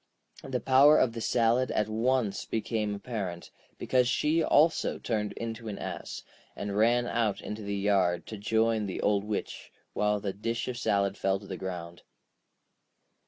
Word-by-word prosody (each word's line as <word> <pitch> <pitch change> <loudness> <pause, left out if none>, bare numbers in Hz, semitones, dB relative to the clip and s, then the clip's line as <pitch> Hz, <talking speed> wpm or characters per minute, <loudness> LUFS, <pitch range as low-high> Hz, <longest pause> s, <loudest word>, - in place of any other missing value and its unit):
The 130 -2 -2
power 135 +4 +6
of 115 - +2
the 115 - -5
salad 120 +3 +2
at 105 - 0
once 115 -1 0
became 110 -2 -2
apparent, 100 -6 -5 0.3
because 125 -1 +2
she 155 +6 +2
also 160 +3 +3
turned 105 -3 -2
into 115 0 -6
an 105 - -4
ass, - - -6 0.3
and 100 -1 -4
ran 120 +3 +3
out 115 -4 0
into 105 +1 -6
the 100 -1 -3
yard 95 -4 +1
to 110 - -7
join 110 +1 +1
the 95 - -4
Old 100 -1 +2
Witch, 105 0 -5 0.2
while 105 0 +1
the 100 -1 -3
dish 115 +3 -3
of 125 -1 -4
salad 100 -4 0
fell 95 0 +1
to 100 - -13
the 95 - -5
ground. 85 -2 -6
110 Hz, 165 wpm, -29 LUFS, 100-120 Hz, 0.3 s, power